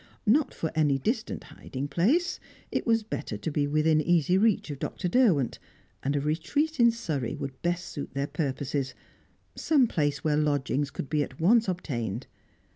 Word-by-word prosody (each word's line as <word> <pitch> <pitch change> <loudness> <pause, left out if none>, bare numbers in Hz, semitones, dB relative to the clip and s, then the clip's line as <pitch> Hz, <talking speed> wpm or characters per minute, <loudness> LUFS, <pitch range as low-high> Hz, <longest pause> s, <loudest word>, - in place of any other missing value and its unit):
Not 270 +8 +3
for 160 - -3
any 150 -3 +3
distant 220 - -2
hiding 135 +2 -6
place; 290 - +1 0.3
it - - -2
was 225 -1 +3
better 160 - -4
to 155 - -4
be 145 0 +1
within 155 +1 +3
easy 175 +1 +3
reach 200 -5 +2
of 140 - -6
Dr. 180 - -3
Derwent, 175 - +3 0.4
and 140 +2 -1
a - - +2
retreat 175 - -1
in 235 0 +7
Surrey 155 - -2
would 135 -1 -6
best 175 0 -1
suit 140 -2 -7
their 140 0 0
purposes, 140 -2 -2 0.6
some 290 -5 +3
place 145 -9 -1
where 150 -1 +2
lodgings 145 -1 +1
could 140 - -6
be 150 +1 +1
at 135 -2 -5
once 220 +7 +4
obtained. 125 - -3
155 Hz, 170 wpm, -28 LUFS, 140-210 Hz, 0.6 s, in